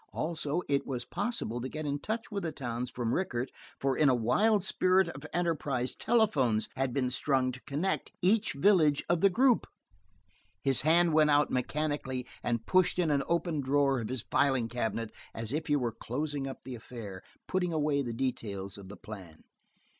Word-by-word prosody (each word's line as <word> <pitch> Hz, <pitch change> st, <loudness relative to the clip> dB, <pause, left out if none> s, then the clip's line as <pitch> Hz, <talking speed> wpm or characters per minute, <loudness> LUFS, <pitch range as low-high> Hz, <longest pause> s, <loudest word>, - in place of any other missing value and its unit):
Also 160 Hz, +1 st, -1 dB
it 140 Hz, -1 st, 0 dB
was 125 Hz, -3 st, -3 dB
possible 120 Hz, -, -2 dB
to 130 Hz, -, -4 dB
get 155 Hz, +2 st, -5 dB
in 145 Hz, 0 st, -1 dB
touch 225 Hz, +7 st, -4 dB
with 200 Hz, -1 st, -2 dB
the 165 Hz, -3 st, -2 dB
towns 125 Hz, -3 st, -4 dB
from 120 Hz, -2 st, -2 dB
Rickett, 130 Hz, -9 st, -1 dB, 0.3 s
for 135 Hz, -1 st, +1 dB
in 150 Hz, -3 st, +4 dB
a 130 Hz, -, +4 dB
wild 195 Hz, -, +3 dB
spirit 185 Hz, -1 st, +3 dB
of 145 Hz, 0 st, -8 dB
enterprise 150 Hz, -7 st, 0 dB
telephones 140 Hz, -, +2 dB
had 135 Hz, -1 st, 0 dB
been 125 Hz, 0 st, 0 dB
strung 130 Hz, -1 st, +2 dB
to 130 Hz, +1 st, -10 dB
connect 155 Hz, +7 st, -1 dB
each 205 Hz, +4 st, +2 dB
village 155 Hz, -2 st, +4 dB
of 170 Hz, -1 st, +1 dB
the 195 Hz, -, +6 dB
group. 245 Hz, +5 st, +3 dB, 1.0 s
His 135 Hz, -2 st, +4 dB
hand 165 Hz, +2 st, +4 dB
went 155 Hz, -1 st, +5 dB
out 145 Hz, 0 st, +3 dB
mechanically 130 Hz, -1 st, -1 dB, 0.2 s
and 115 Hz, -1 st, -1 dB
pushed 185 Hz, -1 st, +3 dB
in 170 Hz, -4 st, +2 dB
an 140 Hz, -1 st, +2 dB
open 170 Hz, -3 st, 0 dB
drawer 135 Hz, -1 st, +2 dB
of 110 Hz, -, -5 dB
his 130 Hz, -3 st, -3 dB
filing 135 Hz, -4 st, +2 dB
cabinet 115 Hz, -2 st, -2 dB, 0.2 s
as 115 Hz, +2 st, -2 dB
if 155 Hz, +2 st, -2 dB
he 145 Hz, -, +3 dB
were 125 Hz, -5 st, 0 dB
closing 140 Hz, +5 st, -3 dB
up 135 Hz, -, -8 dB
the 130 Hz, -, -7 dB
affair, 110 Hz, -5 st, -8 dB, 0.3 s
putting 180 Hz, -2 st, 0 dB
away 150 Hz, -2 st, +1 dB
the 120 Hz, -3 st, -3 dB
details 105 Hz, -6 st, -3 dB
of 95 Hz, -1 st, -11 dB
the 105 Hz, -, -9 dB
plan. 95 Hz, -7 st, -10 dB
140 Hz, 185 wpm, -30 LUFS, 120-165 Hz, 1.0 s, the